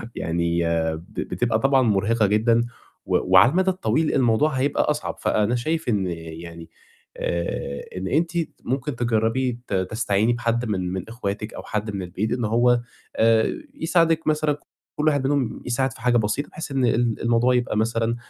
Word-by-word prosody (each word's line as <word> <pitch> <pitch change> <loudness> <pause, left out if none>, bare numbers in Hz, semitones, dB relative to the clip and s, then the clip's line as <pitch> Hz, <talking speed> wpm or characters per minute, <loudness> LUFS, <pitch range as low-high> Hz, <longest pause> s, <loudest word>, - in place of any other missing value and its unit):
يعني 85 +1 0 0.3
ب 85 - -15
بتبقى 115 -2 -1
طبعًا 135 +1 +3
مُرهِقة 110 0 +2
جدًا، 115 +3 +3 0.4
و - - +2
وعلى 95 +7 +7
المَدى 190 +3 +2
الطويل 165 -3 0
الموضوع 130 +3 +3
هيبقى 140 0 +1
أصعب، 150 0 -2
فأنا 105 +3 +1
شايف 160 +4 -1
إن 100 -4 +1
يعني 85 0 -8 0.5
آآ 85 -5 -3
إن 95 +1 -3
أنتِ 165 - +1 0.3
ممكن 135 +1 -2
تجرّبي 120 +1 0
ت - - -5
تستعيني 105 +3 +1
بحد 120 0 -1
من 95 -4 -2
من 95 +1 -4
أخواتِك، 105 -2 -4
أو - - -8
حد 105 0 -3
من 95 - -3
البيت، 95 +4 -3
إن 120 -3 0
هو 120 +2 +3 0.4
آآ 110 0 +3 0.2
يساعدِك 165 - +1
مثلًا 155 -1 +1 0.4
كلّ 150 - 0
واحد 145 -3 +2
منهم 135 -5 -1
يساعد 130 +1 0
في - - -15
حاجة 120 0 +3
بسيطة، 110 +6 -1
بحيث 160 - -7
إن 135 -2 +1
ال 120 -1 +1
الموضوع 120 +2 +3
يبقى 120 -3 0
مثلًا 115 +1 0
115 Hz, 165 wpm, -23 LUFS, 105-130 Hz, 0.5 s, وعلى